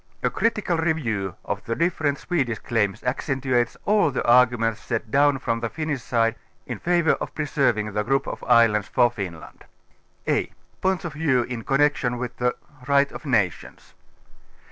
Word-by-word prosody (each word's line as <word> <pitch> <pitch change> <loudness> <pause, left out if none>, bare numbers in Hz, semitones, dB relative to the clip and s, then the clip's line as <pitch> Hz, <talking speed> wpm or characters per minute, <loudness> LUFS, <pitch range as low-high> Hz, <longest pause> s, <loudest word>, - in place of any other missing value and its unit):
A - - +2
critical 210 -6 0
review 120 - -1
of - - -3
the 115 - -2
different 155 -3 0
Swedish 135 -11 -1
claims 105 -5 -1
accentuates 130 -2 -1
all 210 -5 +3
the 130 - -3
arguments 120 -2 +4
set 115 -2 -4
down 145 0 +4
from 115 -3 -2
the 115 0 -3
Finnish 155 +3 -3
┬½ide 115 -1 +1 0.3
in 120 -4 -5
favour 175 -2 +2
of - - -5
j)reserving 125 -8 0
the 105 - 0
group 135 +5 0
of - - -6
islands 115 -4 +4
for 120 -1 +3
Finland. 90 -8 -8 0.6
a) - - +2
V - - -25 0.3
oints 190 -1 +1
of 165 - -4
Vieiv 145 -6 +1
in 120 -2 -6
Connection 135 -2 +1
with 120 -1 -5
the 125 0 0 0.3
Right 140 0 +3
of 155 - -9
No 105 -8 +4
tions. - - -15
125 Hz, 165 wpm, -24 LUFS, 115-150 Hz, 0.6 s, arguments